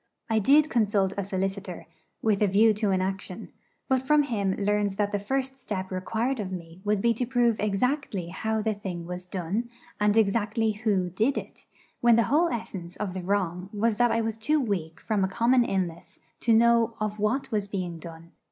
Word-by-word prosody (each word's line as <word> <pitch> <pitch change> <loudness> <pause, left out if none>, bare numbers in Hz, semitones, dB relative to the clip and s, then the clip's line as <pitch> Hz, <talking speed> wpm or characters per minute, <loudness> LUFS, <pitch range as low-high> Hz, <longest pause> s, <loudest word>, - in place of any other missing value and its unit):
I 220 - +3
did 285 +8 +5
consult 205 -6 +1
a 200 - -2
solicitor, 190 -1 -3 0.4
with 215 -2 +2
a 210 - +5
view 215 +3 +5
to 210 0 0
an 190 -1 +2
action; 190 +1 -5 0.4
but 265 -1 +2
from 295 +3 +4
him 205 -8 -1
learned 205 0 +1
that 205 -1 0
the 205 - 0
first 265 +5 -3
step 190 -5 -4
required 220 +8 -1
of 195 -3 -4
me 170 -1 -8
would 205 -1 0
be 235 0 +4
to 245 +2 -2
prove 240 -3 +2
exactly 210 - -1
how 220 +4 -2
the 220 0 +1
thing 185 -4 -6
was 180 +1 -6
done, 190 +6 -3 0.3
and 210 +1 +3
exactly 220 +1 +2
who 205 -4 0
did 225 +9 +1
it, - - -8 0.3
when 235 -1 +5
the 230 - +4
whole 335 +3 +4
essence 190 -7 -5
of 200 -4 -4
the 185 - -4
wrong 185 -1 -1
was 215 0 0
that 245 0 +4
I 230 0 +1
was 225 -1 -2
too 300 +7 +2
weak 180 - -2
from 210 -3 0
a - - +2
common 240 +6 +3
illness 185 -6 -3 0.2
to 230 - +2
know 230 0 +4
of 215 0 -2
what 215 +6 0
was 205 -2 0
being 180 -4 -4
done. 165 +1 -11
210 Hz, 200 wpm, -27 LUFS, 190-230 Hz, 0.4 s, did